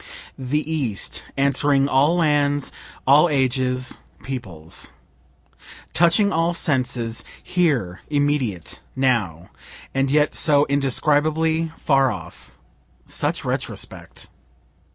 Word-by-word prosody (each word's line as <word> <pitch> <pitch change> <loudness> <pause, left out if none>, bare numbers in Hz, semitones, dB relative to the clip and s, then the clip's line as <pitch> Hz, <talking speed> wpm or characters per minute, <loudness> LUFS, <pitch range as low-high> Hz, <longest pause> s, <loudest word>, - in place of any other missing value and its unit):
The 140 +4 -2
East, 135 -11 -2 0.2
answering 140 0 +3
all 140 +5 +3
lands, 145 -4 +1 0.3
all 145 +6 +6
ages, 130 -2 0 0.2
peoples; 95 -12 -6 1.0
touching 175 +4 +3
all 165 +1 +1
senses, 125 -7 0 0.2
here, 135 - 0
immediate, 145 - -1 0.2
now 110 -11 0 0.4
and 135 0 +1
yet 150 +1 +2
so 145 -2 +3
indescribably 155 +4 +1
far 135 -3 +2
off - - -10 0.5
such - - -1
retrospect! - - -5
140 Hz, 90 wpm, -22 LUFS, 125-150 Hz, 1.0 s, all